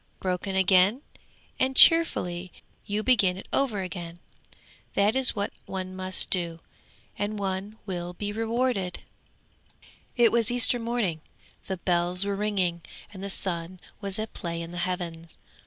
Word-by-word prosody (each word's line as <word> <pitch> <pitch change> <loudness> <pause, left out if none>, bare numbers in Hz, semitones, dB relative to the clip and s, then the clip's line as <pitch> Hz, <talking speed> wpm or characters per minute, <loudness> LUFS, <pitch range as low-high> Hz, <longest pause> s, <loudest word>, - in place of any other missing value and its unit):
Broken 185 +1 -2
again 190 +6 +4 0.6
and 260 0 +1
cheerfully 185 - +5 0.4
you 210 +1 -1
begin 205 -8 +3
it 190 - -10
over 235 -8 +1
again. 175 -2 -6 0.8
That 205 +4 +3
is 265 -2 +4
what 200 -1 -2
one 185 -1 -5
must 185 0 0
do, 170 -3 -1 0.6
and 210 +1 -2
one 195 +2 -3
will 175 -3 -4
be 205 +3 -4
rewarded!" 225 -4 -1 1.1
'It 240 -2 +5
was 235 -1 +2
Easter 245 0 +3
morning, 230 -9 -1 0.5
the 190 - -3
bells 175 +1 0
were 200 0 -1
ringing, 195 -4 0 0.3
and 190 -1 -9
the 200 - -4
sun 180 -2 -2 0.2
was 195 -1 -5
at 220 0 -5
play 170 -3 -4
in 165 - -8
the 175 - -5
heavens. 170 -2 -5
190 Hz, 140 wpm, -27 LUFS, 180-215 Hz, 1.1 s, cheerfully